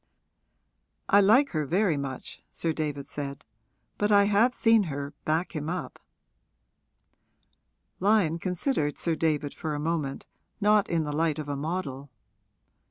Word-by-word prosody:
'I 200 0 +6
like 245 +8 +5
her 155 -2 -1
very 175 +3 +1
much,' 135 -2 -6
Sir 165 -1 -2
David 145 -3 -3
said, 140 -1 -6 0.5
'but 205 +1 +1
I 200 -1 +6
have 210 +5 +4
seen 225 -4 +3
her 145 -2 -5
back 165 +4 -1
him 150 0 -3
up.' 180 +1 -5 2.0
Lyon 190 -5 +2
considered 180 - -1
Sir 165 -2 -1
David 150 -2 0
for 155 -3 -4
a - - -3
moment, 150 -3 -2 0.3
not 210 -1 +3
in 165 -2 +1
the 150 -1 -4
light 160 0 +1
of 155 -2 -5
a 145 - -2
model. 145 -3 -4
160 Hz, 140 wpm, -27 LUFS, 145-200 Hz, 2.0 s, I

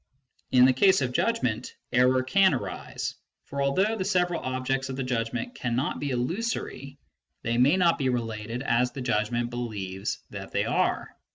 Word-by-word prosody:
In 125 0 +7
the 130 - +5
case 190 +7 +4
of 125 -2 0
judgment, 125 - 0 0.2
error 125 +1 +4
can 190 +5 +4
arise; 100 -7 -4 0.3
for 140 0 -4
although 190 +11 +2
the 195 - -2
several 180 -3 +1
objects 130 +1 -2
of 130 - -3
the 135 - -2
judgment 125 - -2
cannot 125 - -1
be 145 - -2
illusory, 140 - -3 0.5
they 115 +1 0
may 140 +8 +5
not 170 -2 +3
be 130 -2 +1
related 115 0 -3
as 125 -1 +2
the 135 - -6
judgment 120 0 0
be 120 - -5
lieves 100 -5 -3
that - - -8
they - - +1
are. - - 0
130 Hz, 170 wpm, -27 LUFS, 120-145 Hz, 0.5 s, In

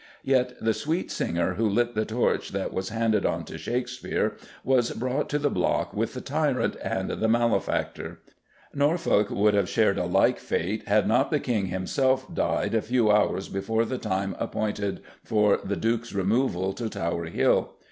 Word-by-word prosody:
Yet 125 -2 +1
the 110 0 +1
sweet 160 +9 -2
singer 85 +2 -1
who 110 +3 +1
lit 120 +3 +1
the 110 -1 0
torch 115 +3 0
that 100 0 -2
was 95 0 -3
handed 110 -2 +1
on - - -1
to - - -8
Shakespeare 125 +1 -2 0.3
was 125 -2 +2
brought 130 +5 -2
to 145 - +1
the 145 -1 0
block 90 - 0
with - - -2
the - - -4
tyrant - - 0
and - - -2
the 110 - 0
malefactor. 115 +1 0 0.5
Norfolk 145 - +2
would 105 +1 +2
have 100 -3 +2
shared 105 -3 +2
a 90 - 0
like 90 - +3
fate, - - -2
had - - +3
not - - +3
the - - +1
King 105 -6 -1
himself 130 +9 0
died - - 0
a 110 - +2
few 115 -2 +2
hours 105 -2 +2
before 110 +4 -1
the 130 +2 -3
time 95 +1 -2
appointed 105 -2 -2 0.2
for 105 -2 +3
the 100 +1 -2
Duke's 115 0 -1
removal 95 -1 +1
to 115 +1 -4
Tower 85 -3 -2
Hill. 80 - +1
110 Hz, 175 wpm, -26 LUFS, 100-125 Hz, 0.5 s, like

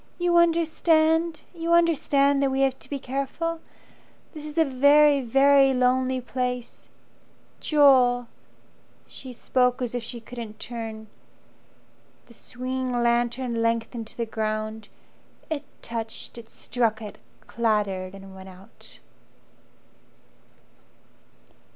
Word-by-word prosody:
You 350 0 +1
understand? 325 -1 +2
You 335 0 -1
understand 285 -4 +3
that 275 - +2
we 265 0 0
have 265 -1 +1
to - - -16
be 285 - -3
careful. 275 +5 -3 0.7
This 305 -2 -8
is 300 - -10
a 325 - +5
very, 285 +2 +5
very 270 +2 +4
lonely 255 +1 +1
place. 250 -1 -5 0.7
Joel!" 255 -5 +4 0.8
She 260 - -10
spoke 250 +1 0
as 245 -2 -3
if 245 - -2
she 235 +1 -7
couldn't 230 -2 -9
turn. 225 -2 -6 1.2
The 235 - -18
swinging 255 +2 -4
lantern 240 0 0
lengthened 230 0 -1
to - - -8
the 235 - -1
ground, 215 -1 -4 0.6
It 295 -2 -3 0.2
touched, 225 -1 -6
it 225 -1 -14
struck 230 -3 -1
it, 210 -2 -9 0.3
clattered 205 -5 -1
and 195 0 -12
went 190 0 -11
out. 185 +1 -15
250 Hz, 115 wpm, -25 LUFS, 230-280 Hz, 1.2 s, a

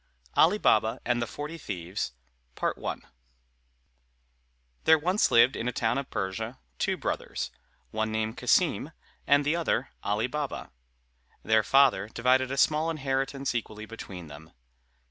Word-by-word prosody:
_ - - -42 0.3
ALI 180 +6 +5
BABA 110 - +3
AND 120 -1 +1
THE 120 - -1
FORTY 150 +7 -6
THIEVES 90 - -4 2.7
There 160 - +7
once 180 +7 +2
lived 120 +3 +5
in 115 - -3
a - - +1
town 120 +2 0
of 140 - -6
Persia 110 +6 -3 0.2
two - - 0
brothers, - - -3 0.4
one 110 0 -1
named 110 0 -1
Cassim, - - +2 0.3
and 145 0 +4
the 150 +3 +2
other 160 -6 0
Ali 105 +2 0
Baba. 145 +2 -4 0.7
Their 110 0 +4
father 125 -4 +4
divided 130 +3 +2
a 135 - -3
small 155 +3 +3
inheritance 135 -2 -1
equally 110 -2 -4
between 95 -5 -8
them. 75 +2 -12
120 Hz, 135 wpm, -28 LUFS, 110-140 Hz, 2.7 s, There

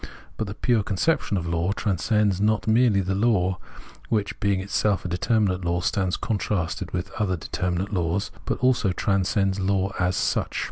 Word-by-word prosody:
But 110 - -3
the 100 - -6
pure 120 -1 +2
conception 100 - 0
of 85 - -3
law 85 +3 0
transcends 100 0 +1
not 110 +1 +1
merely 110 -3 +4
the 95 +1 -1
law, 95 -4 +1 0.5
which, 105 -2 -1
being 100 -1 +1
itself 100 +1 0
a - - 0
determinate 95 +1 +1
law, 85 +1 0
stands 95 0 0
contrasted 100 -5 -2
with 90 +2 -4
other 95 -4 0
de - - -9
terminate 90 +3 -2
laws, 90 +3 -1
but - - -1
also 120 -7 +3
transcends 95 0 +1
law 95 0 0
as 90 +1 +1
such. - - 0
100 Hz, 170 wpm, -25 LUFS, 90-105 Hz, 0.5 s, merely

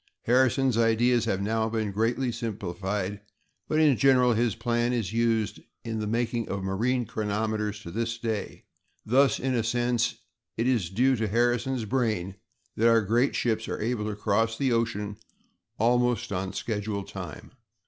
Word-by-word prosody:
Harrison's 130 0 +3
ideas 115 +1 +3
have 100 -3 -1
now 110 +1 0
been 110 -2 -2
greatly 115 +5 0
simplified, 100 -3 -3 0.5
but, 155 - +1
in 150 -4 +5
general, 125 -2 +4
his 115 -2 +1
plan 120 +1 0
is 110 -5 -2
used 115 -3 +1 0.2
in 110 -1 -3
the 105 - -2
making 115 0 -1
of 95 -1 -3
marine 120 +6 0
chronometers 105 0 -2
to 85 - -8
this 115 +3 -2
day; 110 -3 -4 0.4
thus, 135 +4 +3
in 130 0 -1
a 115 -2 +1
sense, 120 0 0 0.4
it 115 - 0
is 115 -10 +1
due 130 +7 +3
to 110 0 -1
Harrison's 120 +2 +1
brain 110 -6 -1 0.4
that 115 - +3
our 115 -1 +5
great 115 +6 +1
ships 115 -2 0
are - - -4
able 110 -1 -1
to 105 - -4
cross 115 +2 0
the 135 -2 +1
ocean 115 -2 0
on 105 0 -6 0.6
almost 120 0 +2 0.2
schedule 105 -2 -3
time. 90 -6 -8
115 Hz, 160 wpm, -27 LUFS, 105-120 Hz, 0.6 s, in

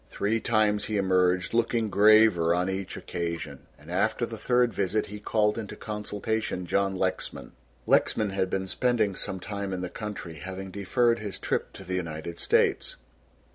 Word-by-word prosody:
Three 110 +3 0
times 110 -2 +2
he 110 - -1
emerged 90 -1 +2
looking 115 -2 +1
graver 105 -5 +5
on 90 +2 0
each 95 0 -4
occasion, 85 -1 -5
and - - -13
after - - +1
the - - -7
third 125 -1 +2
visit 100 +2 0
he 105 +1 -8
called 105 +1 +1
into 105 -3 -6
consultation 105 -2 -3
John 95 +2 +1
Lexman. 95 0 -3 0.3
Lexman 105 -2 +2
had 95 -1 0
been 95 0 -1
spending 115 0 +1
some 95 - -3
time 100 +1 -4
in 90 - -3
the 90 - -3
country, 95 -5 -6
having 95 +2 -6
deferred 115 +5 +1
his 105 -2 -6
trip - - -2
to - - -10
the 90 - -5
United 85 -1 -4
States. - - +2
100 Hz, 165 wpm, -27 LUFS, 90-110 Hz, 0.3 s, graver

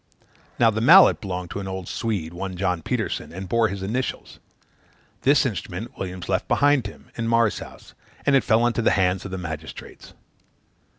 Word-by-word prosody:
Now 115 -1 +4
the 110 +1 -2
mallet 180 +10 +7
belonged 90 -3 -5
to - - -4
an 95 - -6
old 95 -2 -5
Swede, 100 -8 -3
one 95 +1 -5
John 90 -2 -1
Petersen, - - -3
and 95 +2 -7
bore 115 +3 +2
his 100 -2 -5
initials. 120 +7 -4 0.8
This 140 +2 +4
instrument 110 -2 -5
Williams 90 -1 -6
left - - -1
behind 145 -5 +3
him, - - -14
in 115 -1 -3
Marr's 115 -2 +2
house, - - -12 0.3
and 140 - +4
it 135 - +4
fell 115 +2 +3
into 120 -1 +1
the 115 - +3
hands 90 0 +1
of - - -5
the 95 - -5
magistrates. 80 -3 -8
100 Hz, 180 wpm, -23 LUFS, 90-115 Hz, 0.8 s, mallet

